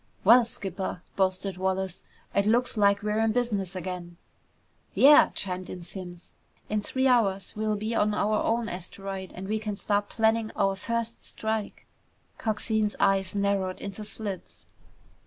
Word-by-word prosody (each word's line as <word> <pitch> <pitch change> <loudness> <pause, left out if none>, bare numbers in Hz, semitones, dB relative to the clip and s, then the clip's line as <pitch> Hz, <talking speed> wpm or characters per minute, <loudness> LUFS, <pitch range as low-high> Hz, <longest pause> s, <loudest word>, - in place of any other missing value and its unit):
"Well, 235 +4 +7
skipper," 190 -4 -5
boasted 190 0 0
Wallace, 190 0 -2 0.3
"it 200 +1 +2
looks 245 +3 +2
like 200 -1 +3
we're 210 +1 0
in 225 -1 +2
business 205 -6 -1
again!" 180 -1 -5 0.8
"Yeah," 290 +2 +8
chimed 185 -1 -3
in 180 -1 -7
Simms. 175 -1 -8 0.4
"In 215 0 0
three 260 +5 -1
hours 200 -7 +2
we'll 215 0 0
be 215 +2 -2
on 210 -1 +2
our 215 +1 +1
own 230 0 0
asteroid 190 +1 -6
and 185 +1 -6
we 215 +1 0
can 210 -1 -3
start 205 0 0
planning 225 0 +1
our 195 0 +2
first 230 +3 -3
strike!" 220 -1 -4 0.5
Coxine's 215 -1 0
eyes 195 -1 +2
narrowed 200 -2 0
into 200 +2 -6
slits. 205 -3 -6
205 Hz, 145 wpm, -27 LUFS, 190-220 Hz, 0.8 s, Yeah